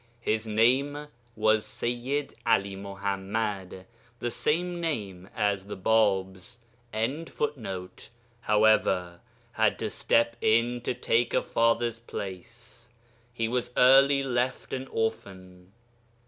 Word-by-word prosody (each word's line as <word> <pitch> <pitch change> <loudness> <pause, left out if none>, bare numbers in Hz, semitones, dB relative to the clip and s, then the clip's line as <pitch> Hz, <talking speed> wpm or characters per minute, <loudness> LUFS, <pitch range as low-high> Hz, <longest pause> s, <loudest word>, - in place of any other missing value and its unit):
His 110 -1 -1
name 135 +7 +2 0.3
was 110 0 +3
Seyyid 120 +6 -3
'Ali 100 -4 +1
Muḥammad 100 0 -4 0.3
(the 120 0 -3
same 175 +6 -1
name 100 - -4
as 100 -2 0
the 105 - -6
Bāb's).] 95 +1 +1 1.8
however, 105 -5 +2 0.3
had - - +1
to - - -3
step 115 0 +1
in 120 +2 +2
to - - -1
take 120 0 +1
a - - +2
father's 115 0 +1
place; 115 +3 -8 0.4
he 115 -2 -2
was 125 +1 -1
early 135 +2 +6
left 125 -1 -2
an 130 0 -4
orphan. 95 -5 -4
115 Hz, 105 wpm, -27 LUFS, 100-120 Hz, 1.8 s, early